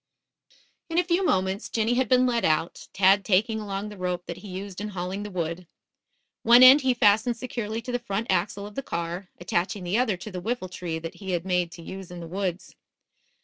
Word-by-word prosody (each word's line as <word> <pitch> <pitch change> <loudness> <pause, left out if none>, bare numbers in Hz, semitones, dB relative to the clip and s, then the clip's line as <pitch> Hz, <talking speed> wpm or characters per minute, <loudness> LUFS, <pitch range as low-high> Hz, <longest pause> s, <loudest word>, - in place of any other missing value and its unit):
In 330 - -2
a 355 - +5
few 355 +2 +1
moments 190 - 0
Jinny 225 +1 +1
had 255 -1 +1
been 255 0 +5
led 235 -3 +1
out, 160 0 0
Tad 195 +1 +4
taking 220 +3 +2
along 200 0 -4
the 210 - -10
rope 180 -1 -2
that - - -6
he 210 - -11
used 190 +1 -7
in 210 - -3
hauling 190 0 -4
the 210 - -5
wood. 170 -1 -4 0.7
One 240 +2 +7
end 265 +3 +9
he 260 -2 +2
fastened 225 +2 +3
securely 230 -2 -4
to 250 - -5
the 245 - -1
front 215 -2 -3
axle 200 +3 -1
of 205 - -9
the 275 - -3
car, 170 -3 -4
attaching 180 +3 -2
the 180 +6 0
other 220 -7 +1
to 210 +4 -8
the 180 -1 -5
whiffletree 180 -6 -3
that 165 - -5
he 190 -2 -5
had 175 0 -2
made 180 -2 0
to 170 - -11
use 190 +1 -8
in 175 0 -8
the 170 - -7
woods. 185 0 -4
200 Hz, 215 wpm, -26 LUFS, 180-230 Hz, 0.7 s, end